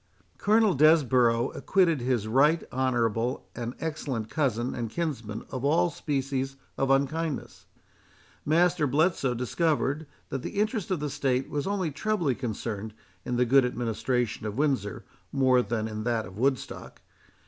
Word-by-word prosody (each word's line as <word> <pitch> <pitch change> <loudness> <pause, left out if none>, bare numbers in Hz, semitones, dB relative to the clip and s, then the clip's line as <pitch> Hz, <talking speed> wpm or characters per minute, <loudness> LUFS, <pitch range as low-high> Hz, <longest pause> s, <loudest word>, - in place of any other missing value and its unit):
Colonel 215 -1 +4
Desborough 130 -6 +4
acquitted 170 -7 +2
his 120 -4 0
right 145 +8 +3
honourable 120 -1 0
and 120 0 -4
excellent 135 -8 -3
cousin 125 -6 0
and 115 -2 -3
kinsman 115 -8 -4
of 130 -1 -4
all 165 +4 +3
species 135 -2 -2 0.2
of 135 - 0
unkindness; 140 +3 -1 0.8
Master 170 0 +3
Bletson 140 -3 +1
discovered, 150 +3 0 0.2
that 135 - -3
the 200 - -4
interest 215 -2 0
of 185 -6 -1
the 150 - -2
state 135 -2 -1
was 145 +1 -2 0.3
trebly 175 -5 0
concerned 110 -3 -4 0.3
in 125 - -1
the 125 +1 +3
good 135 +3 +5
administration 120 -1 -1
of 105 +2 -5
Windsor 135 -10 -1 0.3
more 130 -2 +4
than 110 -1 -2
in 110 -1 -5
that 115 -1 0
of 90 +1 -11
Woodstock. 130 +4 -2
135 Hz, 135 wpm, -27 LUFS, 120-155 Hz, 0.8 s, good